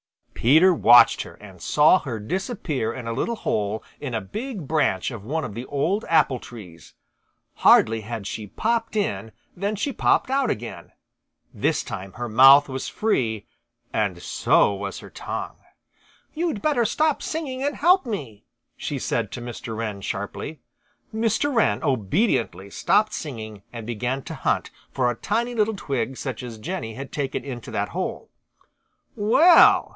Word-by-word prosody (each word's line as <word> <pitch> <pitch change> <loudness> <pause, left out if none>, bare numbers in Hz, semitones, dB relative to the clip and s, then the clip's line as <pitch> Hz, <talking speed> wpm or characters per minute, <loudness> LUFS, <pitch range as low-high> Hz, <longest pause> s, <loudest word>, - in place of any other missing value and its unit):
Peter 160 +10 +5
watched 120 -6 +6
her - - -9
and 95 -4 -14
saw 150 - +5
her 120 -6 -5
disappear 160 - -3
in 125 - -7
a 115 - -3
little 230 - -1
hole 105 - -2 0.2
in 130 -5 -4
a - - +1
big 210 - -6
branch 140 - +1
of 115 -5 -8
one 155 +8 -2
of 105 - -7
the 120 +4 -6
old 175 +10 0
apple 140 -6 +3
trees. 90 -11 -12 0.6
Hardly 115 0 +5
had 110 -1 -6
she 105 0 -5
popped 225 - -1
in 110 - -2 0.2
than 200 +4 -2
she 265 +7 -2
popped 255 - +2
out 270 -2 +2
again. 115 - -5 0.6
This - - 0
time 95 +1 -7
her 120 0 -5
mouth 135 +5 +7
was 130 -1 -4
free, 115 - -1 0.5
and 100 -5 0
so 100 - +2
was 100 0 -5
her - - -11
tongue. - - -6 0.8
"You'd 320 - -2
better 285 -6 +2
stop 305 +6 +1
singing 280 -5 -4
and 290 +1 -1
help 355 -1 +4
me," 130 - -5 0.3
she - - -4
said - - -2
to 125 - -6
Mr. 120 -2 -6
Wren 105 -3 -4
sharply. 100 +11 -5 0.5
Mr. 225 +6 0
Wren 215 - +2
obediently 110 - 0
stopped 210 - +2
singing 110 -8 -6
and 115 -2 -7
began 120 +4 -3
to - - -7
hunt - - -1 0.2
for 125 -2 +1
a - - -5
tiny 235 - -1
little 220 -1 +1
twig 135 - -3
such 130 -5 -5
as 120 -3 -8
Jenny 115 -3 -5
had 135 +1 -8
taken 140 -4 -3
into 125 -4 -7
that - - -2
hole. - - -4 0.8
"Well!" 295 +12 +6
135 Hz, 160 wpm, -24 LUFS, -, 0.8 s, mouth